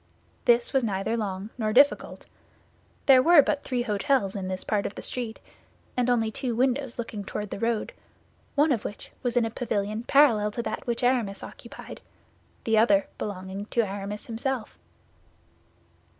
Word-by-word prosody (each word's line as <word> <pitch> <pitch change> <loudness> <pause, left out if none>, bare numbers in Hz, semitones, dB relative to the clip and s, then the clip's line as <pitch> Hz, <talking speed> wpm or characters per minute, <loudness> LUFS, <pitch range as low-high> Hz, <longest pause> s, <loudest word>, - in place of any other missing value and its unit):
This 240 -1 +3
was 265 -2 +3
neither 200 +1 -1
long 205 -1 -4
nor 215 -1 0
difficult. 280 +5 +3 0.8
There 265 -2 +7
were 325 0 +7
but 290 +1 0
three 250 -2 -2
hôtels 215 -1 +1
in 190 -2 -3
this 185 0 -4
part 205 -2 0
of - - -9
the - - -7
street; 235 -3 -3 0.6
and 250 0 +1
only 225 -3 +2
two 240 +1 -3
windows 260 +1 0
looking 225 -3 -5
toward 210 +1 -5
the - - -4
road, 230 -1 -1 0.6
one 295 +1 +4
of 235 -6 0
which 205 - -7
was 245 -2 -1
in 235 - +4
a 225 - -3
pavilion 215 -2 -2
parallel 240 -5 +4
to 235 - -3
that - - -5
which 235 0 -2
Aramis 240 -6 +1
occupied, - - -10 0.6
the 225 -1 +3
other 205 -3 +4
belonging 195 0 -5
to 235 - +1
Aramis 205 0 -5
himself. 235 0 -3
225 Hz, 165 wpm, -26 LUFS, 205-250 Hz, 0.8 s, There